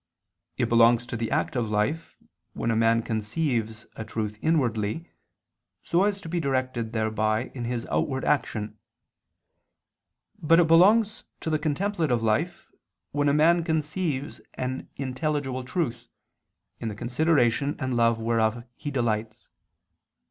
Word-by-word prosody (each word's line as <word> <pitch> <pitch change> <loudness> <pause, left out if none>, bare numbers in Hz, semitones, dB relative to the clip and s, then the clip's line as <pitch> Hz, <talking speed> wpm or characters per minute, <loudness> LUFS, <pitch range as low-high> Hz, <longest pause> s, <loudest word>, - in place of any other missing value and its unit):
It - - +1
belongs 115 +1 +5
to 120 - -5
the 115 -1 -2
active 120 -4 -1
life, 110 +11 -1 0.4
when 115 - -1
a - - +1
man 115 0 +3
conceives 110 0 -2
a 110 - -5
truth 110 -1 -4
inwardly, 130 -2 0 0.7
so 175 +4 +2
as 205 -1 0
to - - -9
be 175 +1 -1
directed 130 -5 -1
thereby 110 +1 0
in 120 -3 -5
his 120 -1 -3
outward 130 -2 -1
action; 110 -6 -1 1.6
but 165 +2 +5
it 175 - +5
belongs 205 +7 +4 0.2
to 160 - -2
the 155 - +1
contemplative 155 - 0
life 155 +11 0 0.4
when 145 0 +1
a - - +3
man 170 +3 +4
conceives 155 -2 -2
an 130 +1 -4
intelligible 135 -1 -2
truth, 130 -1 -3 0.7
in 115 - -4
the 105 - -4
consideration 140 +2 +1
and 130 -3 -2
love 115 -1 +3
whereof 115 0 0
he 145 - -5
delights. 115 -4 -2
130 Hz, 135 wpm, -26 LUFS, 115-155 Hz, 1.6 s, belongs